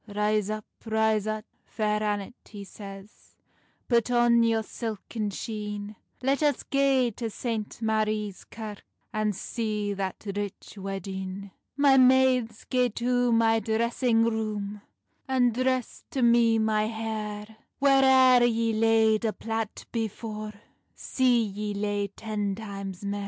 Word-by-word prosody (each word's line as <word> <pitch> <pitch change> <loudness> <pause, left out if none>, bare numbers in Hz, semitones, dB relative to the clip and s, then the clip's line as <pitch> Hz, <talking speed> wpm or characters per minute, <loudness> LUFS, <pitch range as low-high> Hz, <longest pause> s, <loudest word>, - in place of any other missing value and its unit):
"Rise 210 0 0
up, 215 0 -4 0.2
rise 220 -1 +1
up, 215 0 -3 0.2
Fair 210 -1 -1
Annet," 205 0 -2 0.2
he 205 -2 -8
says 195 0 -12 0.5
"Put 235 -1 +2
on 240 -1 +4
your 225 -1 +2
silken 220 -1 -4
sheene; 210 0 -5 0.3
Let 275 +3 +1
us 290 -3 +1
gae 270 -3 +2
to 230 -2 -3
St. 220 -1 -4
Marie's 215 -2 -1
Kirke, 215 -2 -8 0.3
And 215 -2 0
see 210 0 -2
that 195 +1 -4
rich 205 -1 -5
weddeen." 195 0 -5 0.3
"My 280 -2 +5
maides, 255 -3 +4
gae 250 -1 +2
to 245 0 +1
my 225 -1 +4
dressing 225 +2 +1
roome, 210 -2 -2 0.5
And 250 -3 +2
dress 255 0 -1
to 265 - -1
me 235 -1 +5
my 215 -1 +1
hair; 220 -1 -5 0.2
Whaireir 265 -2 +6
yee 225 0 0
laid 220 0 +3
a 220 -2 0
plait 225 -1 -4
before, 215 -1 -4 0.4
See 250 -3 +2
yee 205 0 -4
lay 205 0 -1
ten 205 -1 -3
times 195 -3 -7
mair. 200 0 -2
220 Hz, 130 wpm, -27 LUFS, 210-235 Hz, 0.5 s, Whaireir